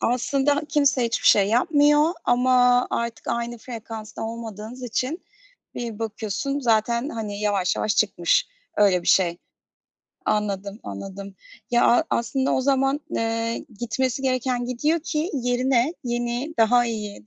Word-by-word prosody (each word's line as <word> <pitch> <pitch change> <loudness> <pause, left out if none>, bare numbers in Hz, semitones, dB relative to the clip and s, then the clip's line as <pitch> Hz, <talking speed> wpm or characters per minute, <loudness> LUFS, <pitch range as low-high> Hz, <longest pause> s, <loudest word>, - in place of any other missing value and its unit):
aslında 275 +4 +1
kimse 280 -4 +2
hiçbir 230 0 -1
şey 200 -1 +6
yapmıyor 295 +6 +4
ama 250 0 +4
artık 235 0 -3
aynı 235 0 -2
frekansta 225 -2 -8
olmadığınız 225 +1 -7
için 255 - -2 0.5
bir 230 -3 -5
bakıyorsun 225 +5 -3
zaten, 235 +2 +1
hani, 210 -4 -5
yavaş 200 -3 +1
yavaş 210 -2 0
çıkmış 185 - +2 0.3
öyle 195 -4 +4
bir - - -3
şey. 175 -2 +3 0.9
Anladım, 200 0 -2
anladım. 195 - -8 0.4
Ya, 240 0 +3
a 240 - +4
aslında 260 +3 0
o - - +2
zaman, 270 +1 +1
eee, 230 0 -1 0.2
gitmesi 255 +2 -1
gereken 255 -1 0
gidiyor 295 +7 0
ki 310 +2 -2
yerine 250 +2 +1
yeni, 240 +5 -2
daha 240 +2 +4
iyi, 210 - -5
235 Hz, 130 wpm, -23 LUFS, 215-260 Hz, 0.9 s, şey